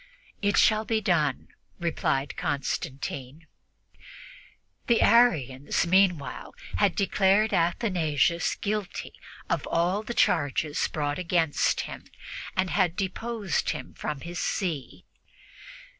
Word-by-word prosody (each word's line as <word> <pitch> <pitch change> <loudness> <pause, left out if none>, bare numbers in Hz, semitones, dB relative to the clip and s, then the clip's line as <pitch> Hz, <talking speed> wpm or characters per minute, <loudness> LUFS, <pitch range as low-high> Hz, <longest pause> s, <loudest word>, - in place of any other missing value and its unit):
"It 205 -1 +1
shall 215 -1 +4
be 220 0 0
done," 155 -9 0 0.3
replied 150 -5 -1
Constantine. 140 -1 -4 1.4
The 235 - +4
Arians, 145 - +3
meanwhile, 180 -5 +1 0.2
had 200 -4 +2
declared 200 +2 +2
Athanasius 170 - +1
guilty 210 -2 -4 0.3
of - - -1
all 180 +5 +1
the 235 +2 -6
charges 150 -2 +1
brought 145 0 -2
against 165 -4 +1
him - - -8 0.5
and 185 -1 +1
had 180 -4 +2
deposed 200 -1 -2
him - - -5
from 150 -3 -5
his 175 +1 -6
see. 165 -9 -3
175 Hz, 100 wpm, -27 LUFS, 150-200 Hz, 1.4 s, shall